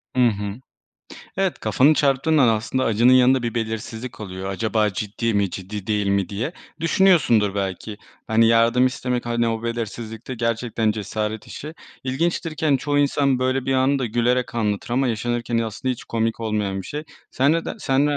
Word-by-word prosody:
Hı 125 -1 +5
hı. 105 0 -3 0.8
Evet, 190 -7 0
kafanı 130 +8 +3
çarptığın 145 +2 +2
an 130 -4 +5
aslında 115 +4 0
acının 115 +3 +4
yanında 130 0 +5
bir 120 0 -3
belirsizlik 110 +1 -4
oluyor. 95 -2 -6
Acaba 110 +2 0
ciddi 105 +3 -2
mi, 100 -2 +1
ciddi 95 +2 -7
değil 105 -2 0
mi 100 -1 +1
diye. 110 +10 -3 0.3
Düşünüyorsundur 155 - +3
belki, 100 +1 -3 0.3
hani, 115 +1 +4
yardım 115 +2 +4
istemek, 125 -1 -2
hani, 120 0 +1
o 115 0 -2
belirsizlikte 115 +1 -5
gerçekten 115 -1 0
cesaret 110 +1 -4
işi. 155 +2 -8 0.3
İlginçtir 160 +5 -1
ki, 160 - -3
hani, 140 -3 +3
çoğu 145 +1 0
insan 140 -2 +2
böyle 130 +1 0
bir 135 - +1
anı 135 +2 +2
da 125 - -1
gülerek 120 +2 0
anlatır 105 -1 -1
ama 130 +2 +1
yaşanırken 120 +1 -1
aslında 115 +3 -2
hiç 120 - -9
komik 115 0 -1
olmayan 105 -3 -2
bir - - -11
şey. 150 +1 -5 0.3
Sen 140 +3 +2
ne 165 0 0
der - - -4
sen 135 +2 +2
ne 145 - +1
115 Hz, 180 wpm, -22 LUFS, 110-130 Hz, 0.8 s, Hı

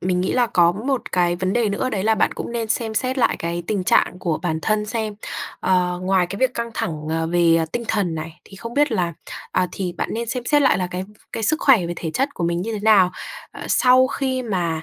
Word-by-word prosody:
mình 180 0 0
nghĩ 185 - 0
là 245 -1 +3
có 175 -4 +4
một 250 +6 -3
cái 175 -1 +2
vấn 185 +1 -1
đề 235 -1 +2
nữa, 205 +6 -1
đấy 200 -5 -2
là 220 0 +4
bạn - - +1
cũng - - -6
nên 230 -2 -2
xem 220 0 -1
xét 255 +4 -1
lại 240 - +2
cái 170 +1 -3
tình 200 -4 -1
trạng 180 - +2
của 170 -4 -1
bản 160 -3 -1
thân 215 -1 0
xem. 220 -1 -3 0.5
Ờ, 180 -1 +1
ngoài 185 -1 +2
cái 200 +3 -6
việc 255 0 +1
căng 235 0 -3
thẳng, 155 -2 -3
ờ, 160 0 -1
về 170 -1 +3
tinh 235 -1 -2
thần 195 -6 0
này, 160 +1 -7
thì 195 - -14
không 230 +4 -8
biết 290 -2 +2
là, 175 -5 0 0.4
à, 185 - +2
thì 185 -2 -3
bạn - - -3
nên 230 +1 -3
xem 250 +1 -3
xét 290 +2 +3
lại 265 - +4
là 180 - -1
cái, 180 - -3
ừm, 195 +3 -8 0.2
cái 225 - -4
sức 305 +9 +2
khỏe 230 -11 +5
về 175 - -3
thể 165 -2 -4
chất 275 - -1
của 170 - -2
mình 170 +1 0
như 225 +2 -3
thế 210 - -3
nào, 205 -4 +5 0.4
ờ, - - -11
sau 255 0 +5
khi 260 -1 -2
mà, 175 -8 -2
200 Hz, 260 wpm, -21 LUFS, 175-235 Hz, 0.5 s, khỏe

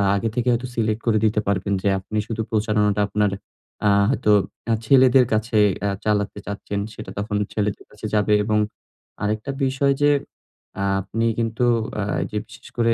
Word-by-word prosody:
আগে 110 +3 0
থেকে 125 0 -1
হয়তো 120 +1 0
সিলেক্ট 110 -1 0
করে 110 -2 +4
দিতে 105 0 +2
পারবেন 100 0 0
যে 100 - +2
আপনি 105 +3 -5
শুধু 115 -1 -3
প্রচারণাটা 105 -1 +1
আপনার 105 -1 +1 0.6
আ - - +5 0.2
হয়তো 105 -5 +2 0.4
আ - - +4
ছেলেদের 130 0 +6
কাছে 110 +1 0 0.3
আ - - +1 0.2
চালাতে 105 -1 0
চাচ্ছেন, 100 0 -4
সেটা - - -8
তখন 105 0 -3 0.2
ছেলেদের 105 -1 -2
কাছে 105 +1 -9
যাবে 105 0 +3
এবং 105 0 +1 0.7
আরেকটা 110 +6 -1
বিষয় 135 +1 +2
যে 145 - +5 0.9
আপনি 115 +4 -2
কিন্তু 115 +1 -1 0.4
আ - - 0 0.3
যে 105 - -2
বিশেষ - - -14
করে 115 -1 +3
110 Hz, 160 wpm, -22 LUFS, 105-115 Hz, 0.9 s, ছেলেদের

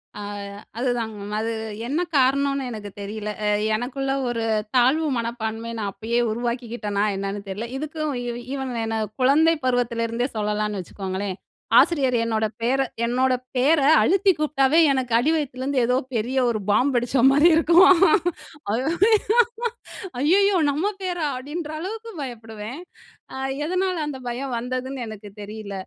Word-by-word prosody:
அ. - - -7 0.6
அதுதாங்க. 235 -3 -1 0.2
அது 225 +1 -1 0.4
என்ன 305 +6 0 0.2
காரணம்னு 275 0 +2
எனக்கு 210 -2 -7
தெரில. 210 +1 -5 0.2
அ - - +2 0.3
எனக்குள்ள 270 +4 -2 0.2
ஒரு 230 -1 -2 0.3
தாழ்வு 270 +6 +4
மனப்பான்மைய 230 0 -4
நான் 200 -2 -2
அப்பயே 225 +4 -1
உருவாக்கிக்கிட்டனா 235 -3 -2
என்னன்னு 195 +1 -3
தெர்ல. 215 +5 -4
இதுக்கும் 310 +1 -3
இ - - -6 0.3
ஈவன் 265 -2 -3
என்ன 225 0 -2 0.2
குழந்தை 300 +6 +5
பருவத்திலேருந்தே 235 -1 0
சொல்லலான்னு 210 -1 -1
வச்சுக்கோங்களேன். 190 +1 -5 0.4
ஆசிரியர் 270 -7 +4
என்னோட 220 -1 0 0.2
பேர 260 +4 +2 0.2
என்னோட 255 +2 +2 0.2
பேர 290 +5 +4 0.2
அழுத்தி 390 +1 +4
கூப்டாவே 300 -1 +2
எனக்கு 260 -3 -1
அடிவயித்துலேருந்து 275 -2 0
ஏதோ 250 +1 +2 0.2
பெரிய 245 +5 -1
ஒரு 220 -2 -1
பாம் 245 +7 +3
வெடிச்ச 245 +1 +1
மாரி 290 +4 +5
இருக்கும்."ஐயய்யோ! 345 - +3 1.3
நம்ம 315 +9 0
பேரா!" 355 -4 -2
அப்டின்ற 300 +4 -5
அளவுக்கு 445 +6 -6
பயப்படுவேன். 225 0 -7 0.5
அ - - -6 0.3
எதனால 370 +2 0
அந்த 275 -3 -5
பயம் 250 +1 -3
வந்ததுன்னு 255 +2 -4
எனக்கு 215 -1 -9
தெரியல. 210 0 -7
255 Hz, 125 wpm, -23 LUFS, 225-295 Hz, 1.3 s, குழந்தை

